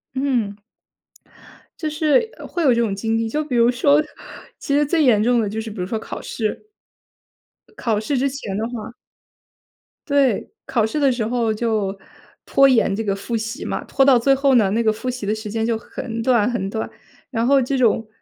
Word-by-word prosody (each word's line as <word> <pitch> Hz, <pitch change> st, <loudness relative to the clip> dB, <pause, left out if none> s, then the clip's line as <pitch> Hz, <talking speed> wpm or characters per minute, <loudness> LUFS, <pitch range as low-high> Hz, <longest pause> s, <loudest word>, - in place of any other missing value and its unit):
嗯。 245 Hz, -7 st, 0 dB, 1.2 s
就 310 Hz, -2 st, -2 dB
是， 315 Hz, +9 st, +2 dB
呃， -, -, -9 dB
会 345 Hz, -, -2 dB
有 260 Hz, -4 st, +5 dB
这 235 Hz, -, +1 dB
种 205 Hz, -4 st, 0 dB
经 225 Hz, +2 st, -1 dB
历， 225 Hz, 0 st, -1 dB
就 300 Hz, +7 st, -1 dB
比 280 Hz, -4 st, -4 dB
如 235 Hz, 0 st, +5 dB
说， 280 Hz, +4 st, +3 dB, 0.6 s
其 280 Hz, -, -3 dB
实 295 Hz, +1 st, +3 dB
最 315 Hz, +1 st, +2 dB
严 220 Hz, -6 st, +4 dB
重 240 Hz, +1 st, +3 dB
的 210 Hz, -, -1 dB
就 220 Hz, +2 st, -4 dB
是 220 Hz, -, -5 dB
比 215 Hz, -, -10 dB
如 180 Hz, -, -2 dB
说 220 Hz, +3 st, -3 dB
考 -, -, -7 dB
试。 220 Hz, -, -4 dB, 1.0 s
呃， -, -, -25 dB
考 225 Hz, -, 0 dB
试 260 Hz, +5 st, -1 dB
之 275 Hz, +2 st, +1 dB
前 260 Hz, -8 st, -5 dB
的 220 Hz, -, -1 dB
话 235 Hz, -1 st, -7 dB, 1.1 s
对， 275 Hz, -6 st, +1 dB, 0.2 s
考 225 Hz, -4 st, +1 dB
试 260 Hz, +8 st, -2 dB
的 275 Hz, -2 st, +4 dB
时 240 Hz, -3 st, -1 dB
候 230 Hz, -1 st, 0 dB
就 215 Hz, -3 st, -1 dB, 0.5 s
拖 275 Hz, 0 st, +5 dB
延 225 Hz, -6 st, +3 dB
这 225 Hz, -, -2 dB
个 200 Hz, -2 st, -1 dB
复 230 Hz, +4 st, -4 dB
习 225 Hz, +2 st, -4 dB
嘛， -, -, -3 dB
拖 270 Hz, -, +2 dB
到 265 Hz, -3 st, +6 dB
最 270 Hz, +3 st, +3 dB
后 275 Hz, 0 st, +2 dB
呢， 215 Hz, -5 st, +4 dB
那 230 Hz, +2 st, +1 dB
个 220 Hz, -1 st, +3 dB
复 255 Hz, +4 st, -5 dB
习 250 Hz, -4 st, -4 dB
的 205 Hz, -, 0 dB
时 215 Hz, -1 st, -6 dB
间 225 Hz, +1 st, -1 dB
就 230 Hz, -1 st, 0 dB
很 230 Hz, 0 st, -6 dB
短 240 Hz, -2 st, +3 dB
很 205 Hz, -5 st, -2 dB
短， 220 Hz, +2 st, -4 dB, 0.4 s
然 230 Hz, -1 st, 0 dB
后 275 Hz, 0 st, +5 dB
这 265 Hz, +2 st, -1 dB
种 225 Hz, -2 st, +2 dB
235 Hz, 225 characters per minute, -21 LUFS, 220-270 Hz, 1.2 s, 到